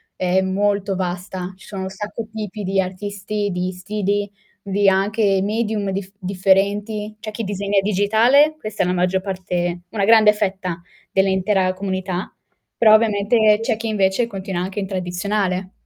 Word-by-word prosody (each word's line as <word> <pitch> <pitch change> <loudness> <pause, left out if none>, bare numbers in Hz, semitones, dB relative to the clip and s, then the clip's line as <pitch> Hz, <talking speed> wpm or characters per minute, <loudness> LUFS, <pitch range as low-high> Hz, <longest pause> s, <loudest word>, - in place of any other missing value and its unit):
è 185 +1 +1
molto 200 +1 0
vasta. 180 0 -4
Ci 190 - -16
sono 195 -2 -5
un 190 - -4
sacco 210 +3 -6
tipi 210 -1 -5
di 195 0 +1
artisti, 205 +2 -4
di 180 +1 -2
stili, 205 +2 -2 0.3
di 200 0 +2
anche 195 +1 +2
medium 210 -2 -1
diff 195 0 -4
differenti, 200 +3 0
c'è 215 0 -6
chi 225 +1 -5
disegna 200 0 0
digitale, 220 +10 +4
questa 215 -2 -2
è - - 0
la - - +1
maggior 185 +1 +1
parte 180 -2 -3
una 205 -3 -1
grande 215 0 +6
fetta, 190 -4 -2 0.3
dell'intera 190 0 +2
comunità, 190 -1 -4 0.4
però 215 -2 +6
ovviamente 215 0 +3
c'è 225 -1 0
chi 225 0 -4
invece 205 +2 +1
continua 190 -4 -4
anche 190 +3 -4
in 195 - -3
tradizionale. 185 +1 -2
195 Hz, 150 wpm, -21 LUFS, 190-210 Hz, 0.4 s, grande